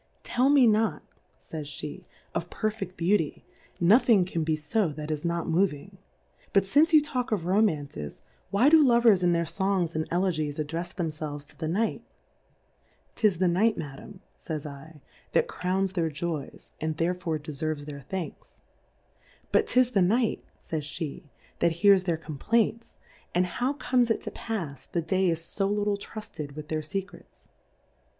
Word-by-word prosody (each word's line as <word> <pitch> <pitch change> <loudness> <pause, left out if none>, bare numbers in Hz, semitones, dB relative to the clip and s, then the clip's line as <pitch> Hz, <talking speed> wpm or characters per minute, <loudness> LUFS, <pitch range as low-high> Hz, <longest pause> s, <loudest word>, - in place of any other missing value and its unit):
Tell 255 +3 +2
me 280 -3 +6
not, 220 0 +2 0.5
[ays 155 -2 -4
Jbe^ 150 0 -7 0.3
of - - -3
perfeft 215 -4 -3
Beauty, 170 -2 +1 0.3
nothing 205 +1 +5
can 170 -3 -2
be 155 0 +1
fo 175 +5 0
that 150 +1 -5
is 150 -1 -3
not 170 -1 -1
moving. 185 +1 0 0.5
But 195 - +5
fmce 295 - +4
you 310 - +8
talk 255 -4 -2
of 195 -6 0
Romances, 155 - 0 0.3
why 220 +7 +4
do 315 0 +7
Lovers 235 -6 +5
in 175 -1 +3
their 170 0 +1
Songs 180 0 0
and 160 0 -1
Elegies 165 -5 0
addrefs 165 +4 -3
them 170 -4 -1
felves 150 -2 -6
to - - -16
the 160 - -4
Night? 210 +8 0 1.1
'Tis 210 -6 +2
tlie 180 0 +2
Night, 215 +6 +3
Madam, 150 +6 -8 0.2
Jhys 155 -4 -4
7, 150 +1 -10 0.3
that - - +3
crowns 190 +1 -1
their 170 -4 0
Joys, 155 -1 -5
and 155 0 -2
therefore 170 -1 0
deferves 150 0 -4
their 145 -1 -7
Thanks. 175 +4 -7 0.9
But - - +3
'tis 250 -1 +3
the 200 - +3
Night, 220 +6 +2
fays 155 -2 -4
pe^ 155 -1 -5 0.3
that 170 - +3
hears 195 +1 +5
their 170 -3 +1
Complaints, 220 +9 -1 0.4
and 180 +1 +4
how 245 +10 -1
comes 250 -4 +1
it 225 - +1
to - - -6
pafs, 170 - -5
the 170 - 0
Day 185 +3 +2
is 165 0 -3
fo 195 -1 +1
httle 205 0 0
trufted 155 -9 -7
with 150 0 -8
their 155 -1 -1
Secrets 190 +5 -7
175 Hz, 160 wpm, -27 LUFS, 155-210 Hz, 1.1 s, you